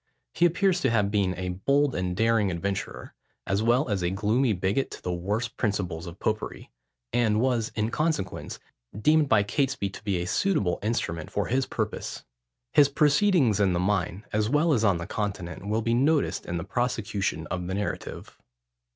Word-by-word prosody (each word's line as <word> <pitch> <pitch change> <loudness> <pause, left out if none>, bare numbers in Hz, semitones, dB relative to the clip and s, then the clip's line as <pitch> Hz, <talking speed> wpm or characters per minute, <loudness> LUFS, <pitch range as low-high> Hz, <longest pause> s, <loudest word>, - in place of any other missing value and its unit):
He 175 - +4
appears 180 +1 +1
to 135 - +2
have 105 -3 +1
been 100 -3 +1
a 90 +1 -4
bold 140 +10 +1
and 90 -1 -2
daring 115 -2 +3
adventurer, 95 +3 -4 0.3
as 95 +2 0
well 120 +5 +3
as 100 -4 -1
a 85 - +1
gloomy 105 +6 +1
bigot 100 +7 0
to - - -9
the 90 - -2
worst 105 +7 -2
principles 95 -6 -2
of 85 +2 -9
popery; 110 0 -3 0.4
and 110 -3 +2
was, 120 -3 +1
in 110 +1 0
consequence, 155 - -2 0.4
deemed 150 +4 +3
by 105 - +5
Catesby 130 -3 -1
to 100 - -11
be 100 -4 0
a 85 - -2
suitable 100 - +1
instrument 90 -7 -2
for - - -1
his 130 +2 0
purpose. 110 -2 -4 0.5
His 140 -1 +6
proceedings 145 - +3
in 95 -3 +3
the 85 - 0
mine, 95 0 -1
as 105 0 +1
well 150 +4 +3
as 115 -5 +1
on 100 -5 +3
the 85 - -5
Continent, 100 -3 -4
will 110 +2 0
be 115 - +1
noticed 140 +5 +1
in 85 - -2
the 85 - -3
prosecution 105 -8 -2
of 90 -1 -3
the 95 - -2
narrative. 105 +1 -5
105 Hz, 180 wpm, -27 LUFS, 95-130 Hz, 0.5 s, His